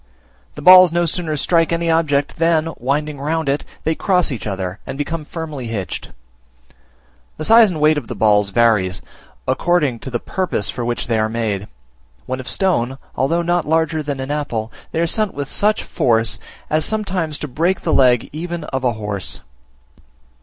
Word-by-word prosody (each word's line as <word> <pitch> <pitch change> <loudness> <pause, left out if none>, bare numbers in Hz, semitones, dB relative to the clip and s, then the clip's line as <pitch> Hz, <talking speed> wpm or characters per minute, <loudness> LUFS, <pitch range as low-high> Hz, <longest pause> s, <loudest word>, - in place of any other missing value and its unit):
The 150 - -8
balls 185 0 +9
no 175 +1 +1
sooner 165 -2 -1
strike 165 +3 +2
any 170 0 0
object, 145 -4 +1
than, 165 -1 +1
winding 145 +3 -1
round 160 +1 -1
it, 140 +2 0 0.2
they 160 - +1
cross 180 -1 +1
each 120 -4 -4
other, 95 0 -4
and - - -5
become 155 +2 -3
firmly 150 -5 -6
hitched. 105 -5 -4 1.3
The 155 - -4
size 225 +4 +7
and 165 -4 -4
weight 150 0 +4
of 120 - -14
the - - -5
balls 105 -2 +3
vary, 105 -3 +3 0.6
according 140 -2 +1
to 130 - -7
the 120 -2 -2
purpose 185 - -2
for 125 - -4
which 120 0 -2
they 115 -2 0
are 110 0 +1
made: 110 -3 -2 0.6
when 130 0 -3
of 130 - -6
stone, 135 -10 0 0.2
although 165 +6 +1
not 175 -1 0
larger 160 0 +1
than 145 -2 -4
an 130 +2 -4
apple, 120 -7 -3 0.2
they - - -2
are 170 - +3
sent 210 +4 -1
with 140 -1 -4
such 210 +1 +1
force 115 -2 +1 0.3
as 155 0 +1
sometimes 185 -8 -1
to 150 - -5
break 165 +8 0
the 160 - -1
leg 125 -3 +4
even 170 +1 -4
of 130 -3 -4
a 125 -2 +2
horse. 105 -3 -4
150 Hz, 180 wpm, -19 LUFS, 120-165 Hz, 1.3 s, balls